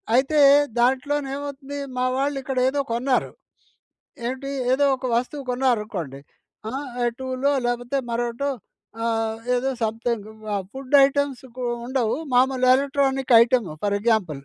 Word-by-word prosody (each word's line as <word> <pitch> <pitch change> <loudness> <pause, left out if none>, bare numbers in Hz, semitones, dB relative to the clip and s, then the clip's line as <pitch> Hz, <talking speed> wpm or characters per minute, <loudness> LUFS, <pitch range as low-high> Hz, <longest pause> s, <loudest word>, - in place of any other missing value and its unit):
అయితే 275 +4 +3 0.4
దాంట్లోనేమవుతుంది 280 +2 -1 0.2
మా 250 - 0
వాళ్ళు 275 +1 0
ఇక్కడ 265 0 -5
ఏదో 280 +1 0
కొన్నారు. 255 +3 0 1.0
ఏంటి? 265 +2 -4 0.2
ఏదో 285 +2 +3
ఒక 260 - -17
వస్తువు 270 +4 -2
కొన్నారనుకోండి. 210 - -1 0.5
ఆ! - - -6 0.3
ఎ - - +3
టూలో 260 +2 0
లేకపోతే 245 +2 -1
మరొకటో 240 +4 -2 0.6
ఆహ్, 225 -1 -1 0.2
ఏదో 260 +2 0
సంథింగ్ 225 -1 -2 0.5
ఫుడ్ 270 +1 -8
ఐటెమ్స్‌కు 265 -3 -3 0.2
ఉండవు. 250 -4 0 0.2
మామూలుగా 255 0 +4
ఎలక్ట్రానిక్ 270 -2 0
ఐటెమ్ 235 -3 +2
ఫర్ 205 0 +1
ఎగ్జాంపుల్. 200 -10 0
255 Hz, 115 wpm, -23 LUFS, 235-275 Hz, 1.0 s, మామూలుగా